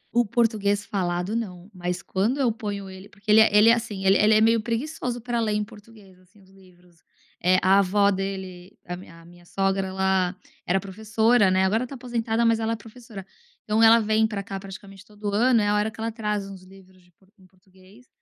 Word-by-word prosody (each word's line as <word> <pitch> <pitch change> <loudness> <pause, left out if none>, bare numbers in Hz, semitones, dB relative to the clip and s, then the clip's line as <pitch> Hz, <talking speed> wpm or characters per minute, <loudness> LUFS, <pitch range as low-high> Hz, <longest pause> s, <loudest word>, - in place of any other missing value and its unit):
O 240 - +4
português 210 -3 0
falado 185 0 -2
não, 185 -4 -6
mas 180 0 -4
quando 220 +9 -1
eu 255 -4 +2
ponho 205 -3 -6
ele 190 +1 -12
porque 205 +1 -5
ele 215 - +7
é 220 - +5
ele 215 +2 +7
é 230 - +7
assim, 215 -5 -4
ele 195 - +5
é 205 - +3
ele 215 0 +5
é 215 - +4
meio 225 0 +3
preguiçoso 245 +1 -4
pra 240 0 -3
ler 215 -2 0
em 210 - 0
português, 205 -3 -16
assim, 185 +3 -25
os 190 -1 -22
livros. 180 -3 -23 0.4
Eh, 185 +1 +4
a 195 +2 +5
avó 200 +1 +2
dele, 190 -1 -6
a 175 - -6 0.3
a - - -18
minha 175 0 -17
sogra 195 +1 -1
ela 190 -1 0 0.3
era 190 +2 +2
professora, 220 +2 +1
né, 185 0 +2
agora 225 +6 0
tá 275 - -9
aposentada 235 -2 -2
mas 230 -1 +3
ela 225 0 -1
é - - -2
professora, 225 -3 -12 0.4
então 215 +1 0
ela 225 +1 +7
vem 220 0 +2
pra 205 -2 -5
cá 195 0 -6
praticamente 195 0 -11
todo 210 -1 -7
ano 235 +1 +3
é 205 - 0
a 205 - +2
hora 210 +1 +1
que 220 0 -16
ela 225 0 -2
traz 210 -3 -3
uns 195 -2 -11
livros 185 0 -18
de 180 0 -27 0.3
em 185 - -20
português, 190 +5 -22
205 Hz, 215 wpm, -24 LUFS, 190-225 Hz, 0.4 s, ele